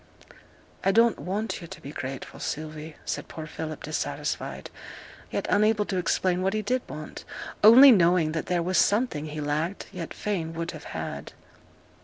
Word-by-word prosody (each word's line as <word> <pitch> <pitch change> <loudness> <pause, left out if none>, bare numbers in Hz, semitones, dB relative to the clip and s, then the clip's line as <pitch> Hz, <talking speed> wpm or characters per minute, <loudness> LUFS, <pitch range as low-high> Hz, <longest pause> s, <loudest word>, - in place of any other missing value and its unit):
'I 195 - +3
don't 230 +2 +4
want 205 +4 -3
yo' 170 - -8
to 190 - -10
be 140 - -8
grateful, 130 -2 -6
Sylvie,' 155 0 -5
said - - -3
poor 160 - -7
Philip, 155 0 -6
dissatisfied, 155 +1 -3 0.6
yet - - -2
unable 210 0 +3
to 190 - -2
explain 180 0 +1
what 190 +2 +1
he 215 - -1
did 255 +4 0
want; 155 0 -7 0.4
only 255 +6 +10
knowing 175 -5 +4
that 160 0 -3
there 175 -1 +1
was 180 -1 +2
something 200 - +2
he 155 0 -6
lacked, 150 +6 -2
yet 180 -4 -6
fain 170 -6 -3
would 165 0 -3
have - - -10
had. - - -5
175 Hz, 165 wpm, -27 LUFS, 155-205 Hz, 0.6 s, only